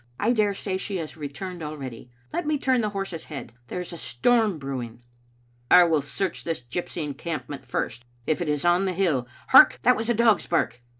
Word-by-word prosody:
I 225 - +2
daresay 200 -3 0
she 195 +1 -4
has 160 -3 -5
returned 165 +4 -6
already. 135 -6 -7 0.2
Let 345 - -2
me 305 -1 +2
turn 260 -3 +2
the 215 - 0
horse's 195 -5 -5
head. 140 -6 -8
There 180 - -4
is 180 0 -5
a 170 - -7
storm 215 - +2
brewing." 125 -4 -6 0.3
" - - -36 0.3
I 180 - +9
will 160 -3 +2
search 170 +6 -3
this 165 -6 -3
gypsy 165 +6 -4
encampment 150 0 -5
first, 120 +2 -3 0.2
if 155 +3 0
it 170 - -1
is 150 +1 -1
on 175 +2 +4
the 185 - 0
hill. 165 -10 +1 0.2
Hark! 125 0 +8
that - - +5
was 225 +2 -3
a 240 - +3
dog's 225 -2 +3
bark. 145 -7 0
170 Hz, 200 wpm, -25 LUFS, 140-195 Hz, 0.3 s, I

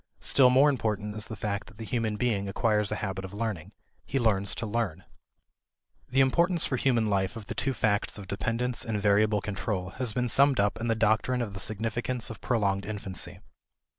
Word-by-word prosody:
Still 130 -2 +5
more 130 +3 +6
important 105 -4 -2
is 110 -1 -3
the 110 - -6
fact 100 0 -3
that 115 - -16
the 115 - -6
human 110 -2 -1
being 105 -4 0
acquires 105 0 +1
a - - 0
habit 95 0 -4
of 95 +1 -8
learning. 105 -7 -3 0.3
He 135 - -2
learns 100 -5 +1
to 115 - -4
learn. 105 -6 -2 1.1
The 135 +2 +3
importance 170 +6 +3
for 130 - -1
human 120 -3 +2
life 100 -2 0
of 110 -3 -8
the - - -5
two 135 -1 -1
facts 105 -1 0
of 100 - -8
dependence 115 +5 -1
and 110 -2 -2
variable 105 +1 +3
control 95 -2 -3
has 125 -3 +1
been 125 +3 0
summed 135 +2 +4
up 100 +2 +1
in 120 - -1
the 115 - +2
doctrine 110 +3 +2
of 105 -4 -6
the 95 - -7
significance 115 +3 -1
of 115 - -10
prolonged 100 -5 0
infancy. 100 -3 -3
110 Hz, 195 wpm, -28 LUFS, 100-120 Hz, 1.1 s, more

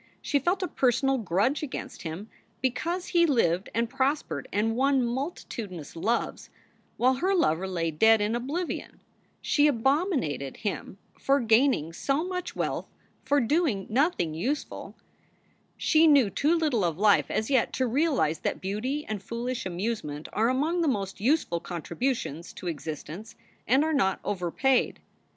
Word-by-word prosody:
She 285 - 0
felt 360 +7 0
a - - 0
personal 270 0 +1
grudge 205 - +1
against 300 -4 -6
him 170 +5 -6 0.3
because 335 +8 -2
he 340 -1 +4
lived 190 - +1
and 230 +1 +1
prospered 270 +4 -1
and 225 +2 +1
won 270 +1 +3
multitudinous 235 - -5
loves, 225 +8 -1 0.5
while 255 +2 +4
her 380 +7 +1
lover 185 - +1
lay 170 -3 -1
dead 220 +8 +5
in 210 +2 0
oblivion. 290 +9 -4 0.4
She 295 0 +4
abominated 265 - 0
him 200 -2 -4 0.2
for 275 +1 +3
gaining 225 - +3
so 275 - 0
much 360 -1 -4
wealth - - -2 0.3
for 285 +2 +2
doing 275 - +1
SOULS - - -12
FOR - - -8
SALE 265 +4 +5
77 335 - +2
nothing 165 - -3
useful. 255 - -3 0.8
She 320 +1 +4
knew 275 -9 +5
too 295 - +2
little 300 - +1
of 165 -3 0
life 205 +1 +4
as 220 +5 -1
yet 260 -4 +3
to 260 - +1
realize 250 - +1
that - - -2
beauty 245 +10 -3
and 215 -3 -4
foolish 235 +1 -4
amusement 175 -5 -3
are 225 +2 +2
among 310 +7 +1
the 330 - +1
most 195 -7 -2
useful 245 - +1
contributions 175 - -3
to - - -10
existence 165 +5 -6 0.3
and 265 +4 +4
are 315 0 0
not 190 -10 +2
overpaid. 205 +8 +1
240 Hz, 155 wpm, -27 LUFS, 190-285 Hz, 0.8 s, dead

